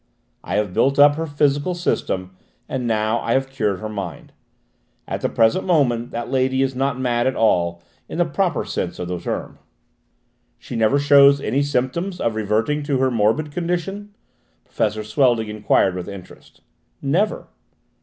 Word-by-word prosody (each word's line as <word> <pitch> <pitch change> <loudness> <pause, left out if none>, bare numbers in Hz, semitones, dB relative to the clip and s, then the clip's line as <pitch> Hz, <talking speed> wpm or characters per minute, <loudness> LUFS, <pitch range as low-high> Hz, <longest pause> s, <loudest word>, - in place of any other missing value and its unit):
I - - -3
have 105 -3 0
built 135 +7 +2
up 145 0 +7
her 160 +2 -4
physical 145 +3 +1
system, 95 - -2 0.3
and 125 -2 -3
now 110 +1 +1
I 115 - -1
have 135 0 0
cured 105 -8 -1
her 110 - -4
mind. 100 -7 -7 0.7
At - - -4
the - - 0
present 115 +11 +2
moment 125 -9 +1
that 120 +1 -5
lady 130 0 +1
is 135 0 -1
not 135 0 -1
mad 120 -1 +1
at 130 - 0
all, 85 -6 +1 0.3
in - - -5
the - - +3
proper - - -1
sense - - -3
of 90 - -5
the 90 -1 -3
term." - - -5 1.0
"She - - -8
never 115 +4 +3
shows 140 0 +6
any 140 0 0
symptoms 145 +7 -1
of 115 - 0
reverting 110 +7 0
to 145 -2 -1
her 130 0 +1
morbid 115 +7 +1
condition?" 180 +5 -3 0.5
Professor 110 0 -1
Swelding 115 -1 +1
enquired 105 -3 +2
with 90 +1 -6
interest. 100 -2 -12 0.4
"Never." 175 +10 -1
130 Hz, 165 wpm, -21 LUFS, 110-145 Hz, 1.0 s, up